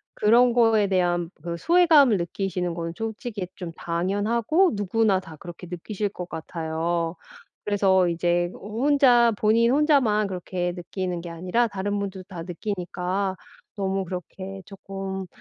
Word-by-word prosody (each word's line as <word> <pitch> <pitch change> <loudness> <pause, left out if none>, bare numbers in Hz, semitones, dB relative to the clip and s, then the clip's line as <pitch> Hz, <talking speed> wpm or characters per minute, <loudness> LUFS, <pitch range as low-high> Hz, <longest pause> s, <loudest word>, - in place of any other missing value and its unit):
그런 240 +4 +5
거에 225 -4 +4
대한 175 -3 +1
그 170 +1 -4
소외감을 315 - +5
느끼시는 180 0 -2
거는 165 0 -4
솔직히 220 -3 -4
좀 175 -3 -6
당연하고 210 - +1
누구나 205 0 +1
다 165 -4 -11
그렇게 175 +2 -10
느끼실 200 +4 -3
것 180 -3 -7
같아요. 165 +1 -3 0.5
그래서 195 -3 +3
이제 175 +1 +1
호 215 +6 -4
혼자, 250 -5 +5
본인 230 +3 +3
혼자만 265 -8 +3
그렇게 180 -1 -3
느끼는 180 0 -4
게 175 - -7
아니라 180 +8 0
다른 205 0 -2
분들도 190 -2 -5
다 175 -4 -7
느끼니까 185 +1 -3 0.4
너무 195 0 -1
그렇게 190 +2 -7
쪼끔 195 -1 -6
190 Hz, 310 characters per minute, -25 LUFS, 175-220 Hz, 0.5 s, 그런